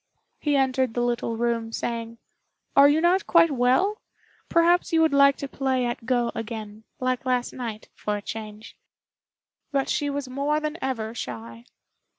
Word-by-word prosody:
He 295 -1 +1
entered 260 -3 +1
the 240 - +1
little 240 -1 -1
room, 230 -1 -1
saying, 230 0 -4 0.6
"Are 280 +1 +8
you 305 +2 +3
not 355 +3 +2
quite 335 -2 +5
well? 270 - +2 0.5
Perhaps 345 +2 +3
you 325 - +3
would 320 -2 +3
like 280 0 +6
to 280 - -5
play 265 -2 -1
at 240 -1 -4
Go 240 -2 +1
again, 220 -1 -7
like 255 0 -1
last 250 -2 0
night, 230 -4 -6
for 210 0 -3
a - - -7
change;" 215 0 -8 1.0
but 275 -2 0
she 290 - 0
was 280 -1 -3
more 280 +4 0
than 305 +1 -4
ever 225 -4 -3
shy. 115 - -7
255 Hz, 165 wpm, -25 LUFS, 230-285 Hz, 1.0 s, Are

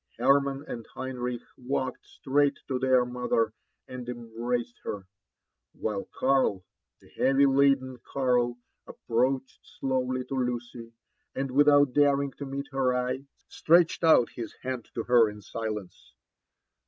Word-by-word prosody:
Hermann 140 +3 +2
and 115 - -6
Henrich 125 -2 -4 0.2
walked 130 0 -3
straight 145 +1 +1
to 130 -2 -1
their 130 -1 +3
mother 125 -3 0 0.3
and 125 -1 -7
embraced 120 0 -4
her; 100 -2 -5 0.7
while 105 -3 -4
Karl, 130 -9 +1 0.3
the - - -21
heavy 135 +1 +3
laden 135 -2 +3
Karl, 125 -3 +1 0.3
approached 130 +3 -1 0.2
slowly 130 -1 -1
to 130 - -7
Lucy, 120 -2 -3 0.4
and, 135 0 -2
without 145 -1 +5
daring 140 -1 +3
to 140 - -5
meet 140 +1 -4
her 130 -2 +1
eye, 125 +2 -3 0.2
stretched 170 +1 +3
out 160 -7 +5
his 115 -2 -7
hand 130 -2 -4
to 115 - -2
her 120 -2 +5
in 105 0 -10
silence. 105 -2 -6
125 Hz, 130 wpm, -28 LUFS, 120-135 Hz, 0.7 s, without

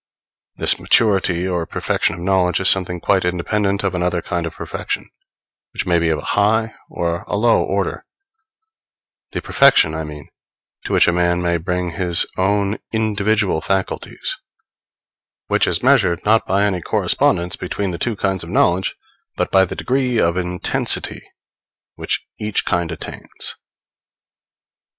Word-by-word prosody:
This - - +2
maturity 95 -4 +2
or 85 -3 -2
perfection 85 - -1
of 85 - -10
knowledge 90 -1 +1
is 95 - +2
something 90 -2 +4
quite 95 +1 +1
independent 100 +3 -1
of 95 -2 -1
another 90 0 0
kind 85 -3 -2
of 80 - -9
perfection, - - -4 0.7
which - - -2
may 85 -1 +2
be 85 -1 +1
of 80 - +1
a - - -6
high 110 +2 +2 0.2
or 85 0 -3
a - - -2
low 115 -2 +3
order 95 +2 -2 1.3
the - - -4
perfection, 135 - +4
I 80 0 -3
mean, 75 -2 -9 0.6
to - - -3
which - - +5
a - - +4
man 85 0 +1
may 85 -1 0
bring 90 +1 -3
his 85 +1 +4
own 100 +2 0
individual 110 -4 0
faculties; 95 +1 -2 1.1
which - - +2
is - - 0
measured, 85 -1 +3
not 110 +1 +3
by 100 +2 +2
any 95 -3 0
correspondence 85 +2 +1
between 95 +1 -3
the 85 - -6
two 120 -3 -1
kinds 95 -2 -1
of 85 - -9
knowledge, 90 +2 +1 0.4
but - - -2
by 95 0 +5
the - - -6
degree 125 -2 0
of 85 0 +2
intensity 90 -1 0 0.7
which - - -3
each 105 -1 -1
kind 85 -2 -1
attains. 85 - -2
90 Hz, 150 wpm, -19 LUFS, 85-100 Hz, 1.3 s, which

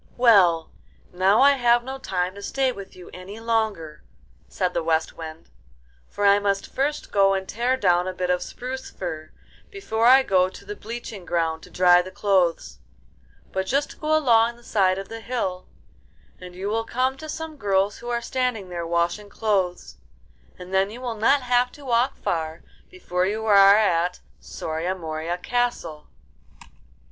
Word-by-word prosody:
'Well, 190 -9 +4 0.4
now 190 +5 +3
I 280 +1 +7
have 240 -3 +3
no 265 +2 -6
time 185 -6 -2
to 200 - -11
stay 265 +4 0
with 200 -5 -10
you 180 - -13
any 190 +4 -9
longer,' 220 -9 -2 0.5
said 180 -1 -2
the 170 - 0
West 160 0 0
Wind, 160 -1 -10 0.6
'for 205 - -2
I 200 0 +6
must 200 -1 -2
first 290 +3 -2
go 195 -1 +4
and 190 0 -4
tear 245 +4 0
down 180 -5 +2
a 185 - -3
bit 180 0 -1
of 180 0 0
spruce 255 +7 -6
fir 155 -4 -6 0.4
before 230 - -1
I 265 +2 +7
go 185 -5 +2
to 195 - -13
the 205 +1 -6
bleaching 225 -3 -8
ground 165 -2 -1
to - - -14
dry 180 -1 +5
the 180 - -8
clothes; 175 - 0 0.7
but 190 0 -2
just 280 +5 -1
go 310 0 +2
along 235 -5 +3
the 240 - -20
side 190 -5 +1
of 195 0 -6
the 225 0 -8
hill, 195 -7 -3 0.7
and 180 -1 -11
you 190 +2 -5
will 225 +1 0
come 255 +3 0
to 310 +2 -9
some 320 0 -6
girls 200 -4 0
who 240 - -7
are 235 -1 -2
standing 250 -8 -2
there 170 -1 -5
washing 170 +5 -1
clothes, 195 -4 -2 0.6
and 180 +1 -10
then 190 +1 +2
you 230 +4 -9
will 245 -2 -4
not 255 +6 +2
have 245 0 +2
to 290 - -13
walk 240 0 +1
far 160 0 -3 0.3
before 185 - -2
you 220 +2 -3
are 200 -1 +7
at 180 -4 +1 0.2
Soria 165 +4 -4
Moria 160 0 -4
Castle. 180 -8 -2
200 Hz, 175 wpm, -24 LUFS, 180-240 Hz, 0.7 s, I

